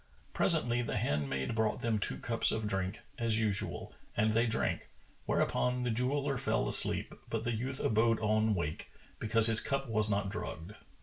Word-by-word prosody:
Presently, 120 +1 +2
the 115 - -2
handmaid 70 - -1
brought 110 -1 0
them 115 -2 +1
two - - -2
cups 115 -1 +1
of 110 -1 -1
drink, 95 -2 -2 0.2
as 115 -2 +2
usual, 105 -3 -1 0.2
and 110 +1 +3
they 115 +2 +3
drank; 115 0 -1 0.4
whereupon 125 0 +1
the 125 - 0
jeweller 135 +3 0
fell - - +1
asleep, - - +1 0.2
but - - -2
the 120 - 0
youth 130 +4 -3
abode 115 +1 +3
on 110 0 +2
wake, 80 -4 -3 0.3
because 110 +1 +2
his 115 -1 +4
cup 135 0 -1
was 110 -2 +1
not 100 -1 0
drugged. 105 -3 -5
110 Hz, 170 wpm, -33 LUFS, 105-120 Hz, 0.4 s, his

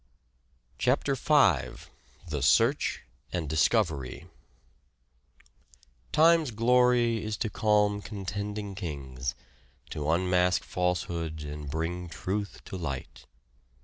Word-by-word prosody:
CHAPTER 135 +2 +2
V 130 - +2 0.4
THE - - -3
SEARCH - - +3 0.3
AND 85 -4 -2
DISCOVERY 80 - +1 1.3
" 65 -4 -29 0.3
Time's 165 -2 +5
glory 120 0 +3
is 110 -1 -3
to 110 -2 -2
calm 105 -1 +2
contending 100 0 -5
Kings, 70 -9 -5 0.6
To 75 0 -3
unmask 90 +1 +2
falsehood 85 -3 -2
and 75 -1 -6
bring 85 +3 -3
truth 100 +5 -4
to 95 - -6
light." 70 -7 -6
90 Hz, 95 wpm, -28 LUFS, 80-110 Hz, 1.3 s, Time's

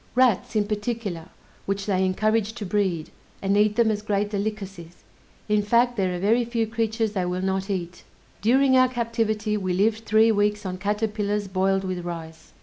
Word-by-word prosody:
Rats 245 -4 +2
in 210 -1 +2
particular, 205 -5 -4 0.4
which 195 0 -2
they 190 -2 +1
encourage 215 +3 +1
to 225 -3 -6
breed, 185 -5 -1 0.3
and 195 0 0
eat 210 0 +3
them 230 -1 +3
as 210 -1 -2
great 205 -1 -1
delicacies; 195 -5 -5 0.4
in 210 -1 +2
fact, 235 +4 +2
there 185 -4 0
are - - -4
very 225 +6 +3
few 230 -1 -1
creatures 225 0 -1
they 190 -3 -1
will 180 +1 -2
not 190 +1 -1
eat. 180 -3 -4 0.4
During 260 +4 +4
our 255 0 +5
captivity 225 -3 -1
we 185 -3 -2
lived 220 +4 +1
three 220 +1 +4
weeks 205 0 +1
on 185 -1 -4
caterpillars 210 0 -1
boiled 190 +1 +1
with 185 -2 -3
rice. 165 -2 -8
205 Hz, 175 wpm, -24 LUFS, 190-220 Hz, 0.4 s, our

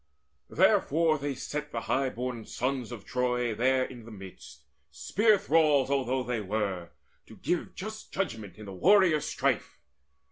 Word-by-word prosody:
Therefore 155 0 +3
they 140 -1 -3
set 150 +3 -5
the - - -3
high 135 0 0
born 125 -2 -4
sons 125 +1 -3
of 115 -5 -8
Troy 125 -2 0
There 130 +4 +2
in 120 -3 -10
the - - -10
midst, 95 -9 -12 0.3
spear 215 0 +2
thralls 155 -7 +3
although 130 -1 0
they 120 -2 -2
were, 100 -4 -2 0.4
To - - -13
give 175 - -2
just 215 +3 -7
judgment 110 - -4
in 110 - -10
the 100 - -8
warriors' 175 - +4
strife. - - -1
130 Hz, 150 wpm, -29 LUFS, 110-150 Hz, 0.4 s, warriors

